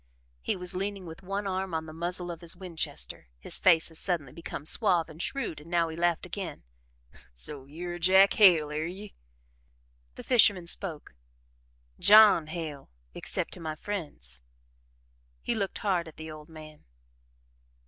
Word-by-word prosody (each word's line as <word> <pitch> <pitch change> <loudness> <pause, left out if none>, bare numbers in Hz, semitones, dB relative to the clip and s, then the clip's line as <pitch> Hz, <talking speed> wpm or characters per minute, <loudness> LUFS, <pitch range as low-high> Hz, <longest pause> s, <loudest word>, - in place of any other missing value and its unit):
He - - -1
was 180 0 -4
leaning 195 0 -3
with 160 +1 -9
one 195 +2 -3
arm 190 -2 -2
on 160 0 -2
the 155 - -9
muzzle 175 +2 -3
of 170 0 -9
his 170 +1 -2
Winchester, 175 - -5
his - - -3
face 170 -3 +4
had 160 - -8
suddenly 165 -9 -2
become 160 -3 -7
suave 175 -3 +3
and 160 +2 -8
shrewd 225 - -3
and 160 - -14
now 170 -1 +2
he 160 - -6
laughed 170 0 +1
again: 185 0 -6 0.7
"So 135 - -2
you're 175 +5 -6
Jack 190 +3 +6
Hale, 170 -8 +6
air 155 +2 -2
ye?" 195 +4 -9 1.0
The - - -9
fisherman 205 -7 +5
spoke. 170 - -5 0.9
"JOHN 205 -6 +7
Hale, 155 -4 -6 0.2
except - - -2
to - - -3
my 160 -2 -4
friends." 145 - -4 1.0
He - - 0
looked 195 -3 -2
hard 185 -6 0
at 160 - -13
the 160 0 -7
old 155 0 -11
man. 155 -1 -12
170 Hz, 160 wpm, -29 LUFS, 155-190 Hz, 1.0 s, JOHN